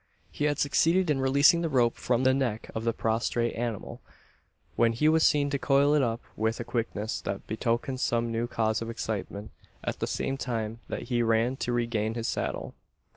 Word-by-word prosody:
He 150 - -2
had 145 -1 +1
succeeded 165 +5 +2
in 135 -2 0
releasing 140 +5 +5
the 165 - -1
rope 120 -4 +2
from 125 0 0
the 130 0 +4
neck 125 -5 -2
of 110 +1 -4
the 115 - +3
prostrate 115 +1 0
animal, 115 -3 -4 0.7
when 115 -1 +3
he 135 +7 +2
was 160 +1 +4
seen 145 -1 +3
to 140 - 0
coil 140 +2 +3
it 150 - +4
up 120 -2 -1
with 110 +1 -1
a - - -2
quickness 110 -3 -3
that - - -4
betokened 120 +3 -1
some 115 -2 0
new 115 +1 -1
cause 110 -2 0
of 115 - -4
excitement 110 -2 -4 0.3
at - - -3
the - - -1
same 135 - -2
time 115 -3 -3
that - - -4
he 120 -2 +1
ran 115 +2 +2
to 120 - -2
regain 115 -2 -1
his 115 -1 -2
saddle. - - -3
120 Hz, 195 wpm, -28 LUFS, 115-135 Hz, 0.7 s, releasing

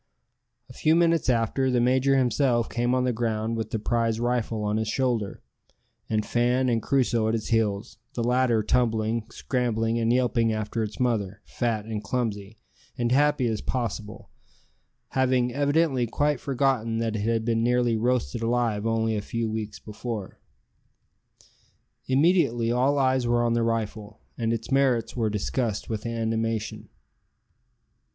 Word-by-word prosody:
A 125 - -13
few 155 +5 +2
minutes 165 -3 +3
after, 125 +2 +1
the 125 -1 +2
major 130 +3 +3
himself 125 -2 +2
came 120 +1 0
on 130 - +1
the 125 -1 +1
ground 110 -1 -1
with 115 -1 -3
the - - -2
prize 115 0 0
rifle 120 -2 -1
on 105 +1 0
his 110 -1 -1
shoulder, 115 -4 -1 0.7
and 110 -1 0
Fan 125 +2 +1
and 115 -2 +1
Crusoe 120 -3 +1
at 110 - +1
his 110 - -4
heels 110 -1 0 0.2
the 120 - -1
latter 120 -2 +2
tumbling, 110 0 0
scrambling, 115 -2 -1
and 115 0 +1
yelping 120 -2 +2
after 110 +1 -2
its 105 -1 -4
mother, 105 -5 -1
fat 115 -4 -2
and 110 -2 -4
clumsy, 105 -2 -3 0.4
and 120 -1 0
happy 145 -1 +3
as 110 -3 -1
possible, 110 -4 -4 0.8
having 130 -2 +1
evidently 145 -2 +1
quite 145 +3 0
forgotten 130 -4 0
that 115 -1 -1
it - - -2
had 115 +1 0
been 115 -1 +1
nearly 120 0 +2
roasted 120 0 0
alive 115 -2 0
only 110 -1 +1
a 105 - -1
few 115 +2 -3
weeks 110 -2 -4
before. 105 0 -6 1.7
Immediately 130 -5 +3
all 130 +4 +2
eyes 130 -2 +2
were 120 0 +2
on 120 -1 +1
the 120 - +1
rifle, 110 -2 -3 0.2
and 115 -1 -1
its 115 +3 -3
merits 130 -4 +2
were 115 -3 0
discussed 105 +1 -2
with 110 +1 -3
animation. 115 -1 -2
115 Hz, 150 wpm, -26 LUFS, 110-125 Hz, 1.7 s, minutes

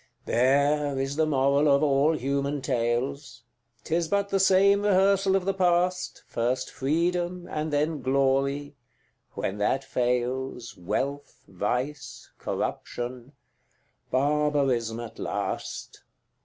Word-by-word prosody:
CVIII. - - -40
There 140 +3 +2
is 135 +1 -2
the 160 0 +2
moral 140 +1 +3
of 140 +1 +4
all 145 +2 +3
human 140 0 -2
tales: 120 0 -2 0.4
'Tis 165 +1 0
but 200 +2 0
the 195 - +1
same 195 +1 +5
rehearsal 195 -1 +3
of 190 -2 0
the 195 - +1
past, 180 -1 0
First 125 +2 -2
Freedom, 175 +5 -1
and 155 -2 -3
then 150 0 0
Glory 135 +2 +1 0.6
when 100 +2 -3
that 130 +6 +1
fails, 125 0 -2
Wealth, 135 +11 -4
vice, 125 +6 -4
corruption 125 +2 -4 0.8
barbarism 135 -4 +1
at 120 -2 -8
last. - - -4
140 Hz, 115 wpm, -26 LUFS, 130-160 Hz, 0.8 s, same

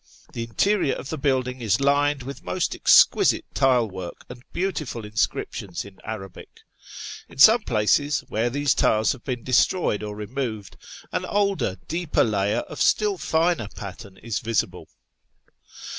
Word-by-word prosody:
The 115 - -4
interior 140 - +1
of 135 - -8
the 160 - -3
building 130 -2 0
is 105 -3 +1
lined 140 0 +2
with 135 +1 -8
most 185 - -1
exquisite - - +5
tile 130 -4 +3
work, 95 -3 -8
and 125 0 -10
beautiful 155 - -3
inscriptions 100 -3 -3
in 100 -1 -14
Arabic. 100 -4 -9 0.7
In - - -15
some 220 - +8
places, 140 - +1
where 115 +3 0
these 145 +1 +1
tiles 110 0 +2
have 130 - -7
been 125 -3 -4
destroyed 130 - +2
or 105 -1 -5
removod, 110 -2 -5 0.4
an - - -2
older, 200 - 0
deeper 165 -1 +1
layer 100 -2 0
of - - -8
still 205 -3 +2
finer 160 - +1
pattern 100 0 -9
is 115 -2 -3
visible. 115 -1 -2
125 Hz, 145 wpm, -24 LUFS, 105-145 Hz, 0.7 s, some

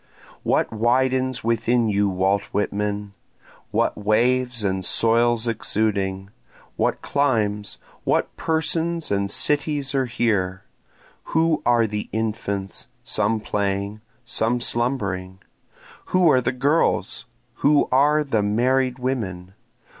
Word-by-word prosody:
What - - 0
widens 130 +2 +1
within 115 +1 +1
you 100 -1 +1
Walt 95 +2 +1
Whitman? 105 0 -2 0.6
What - - 0
waves 120 +3 +1
and 95 -1 -1
soils 115 +3 +3
exuding? 100 -3 -1 0.4
What - - -1
climes? 110 -7 0 0.3
what - - 0
persons 165 0 -1
and 100 0 0
cities 145 0 +1
are 135 -2 +1
here? 100 -6 -1 0.7
Who 160 -1 +2
are 120 -1 +4
the 105 -1 -4
infants, 105 -3 -3 0.2
some 110 -1 +1
playing, 100 0 -2 0.2
some 120 0 0
slumbering? 100 -7 -1 0.7
Who 180 -3 +3
are 130 - +4
the - - 0
girls? 140 +6 0 0.3
who 145 +1 +3
are 145 +4 +4
the 115 -7 0
married 125 +5 +1
women? 95 -9 -4
115 Hz, 110 wpm, -22 LUFS, 100-130 Hz, 0.7 s, are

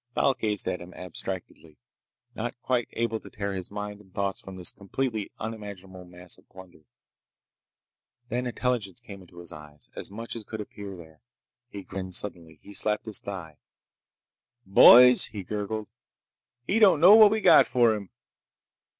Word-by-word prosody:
Thal 135 - +3
gazed 105 -5 -3
at 90 - -2
him 85 +1 -12
abstractedly, 90 -3 -8 0.6
not 120 +2 -5
quite 125 -2 0
able 115 -1 -1
to - - -13
tear 100 -1 -4
his 95 -1 -6
mind 105 0 -6
and 95 -2 -22
thoughts 100 0 -3
from 95 - -10
this 90 -1 -2
completely 110 +1 -4
unimaginable 100 -4 -8
mass 90 0 -10
of - - -27
plunder. 90 -4 -15 1.4
Then 125 +2 -2
intelligence 120 -6 -2
came 100 -5 -12
into 90 -1 -18
his 85 -1 -10
eyes—as 75 -1 -10
much 115 +4 -7
as 115 - -7
could 110 +1 -8
appear 100 -2 -8
there. 80 -2 -15 0.5
He 100 -3 -8
grinned 95 -1 -6
suddenly. 85 -6 -4
He 100 - -12
slapped 105 +1 -1
his 110 -3 -1
thigh. 85 -6 -8 1.1
"Boys!" 125 +5 +8
he 105 -3 -8
gurgled. 105 +2 -4 0.8
"He 215 - +1
don't 195 -8 +6
know 180 +6 +8
what 215 -1 +9
we 220 +1 0
got 190 -4 +6
for 120 -3 +3
him!" 100 -3 -6
100 Hz, 160 wpm, -27 LUFS, 90-115 Hz, 1.4 s, what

